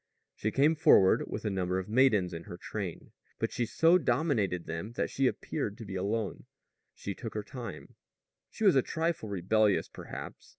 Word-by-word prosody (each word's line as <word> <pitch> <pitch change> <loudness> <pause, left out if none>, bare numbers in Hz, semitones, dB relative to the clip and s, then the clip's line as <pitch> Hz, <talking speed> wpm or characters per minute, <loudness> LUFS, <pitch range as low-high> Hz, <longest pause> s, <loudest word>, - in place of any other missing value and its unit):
She 110 - -2
came 140 +7 +4
forward 100 -11 +5
with - - -5
a 105 - 0
number 90 -1 -1
of 95 - -3
maidens 105 -6 +3
in 85 0 -7
her 85 - -8
train, 95 -3 -6 0.3
but - - -1
she 120 - -1
so 165 +9 +4
dominated 120 - 0
them 85 +8 -5
that - - -2
she 135 -1 +2
appeared 110 -6 -3
to 115 - -8
be 95 - -7
alone. 100 +2 -2 0.5
She 100 - -5
took 115 +3 -7
her 105 - -2
time. 120 +2 -8 0.6
She - - -6
was 195 -6 +6
a 135 - +6
trifle 160 -6 -2
rebellious, 100 +2 +2
perhaps. - - -9
110 Hz, 180 wpm, -30 LUFS, 95-135 Hz, 0.6 s, was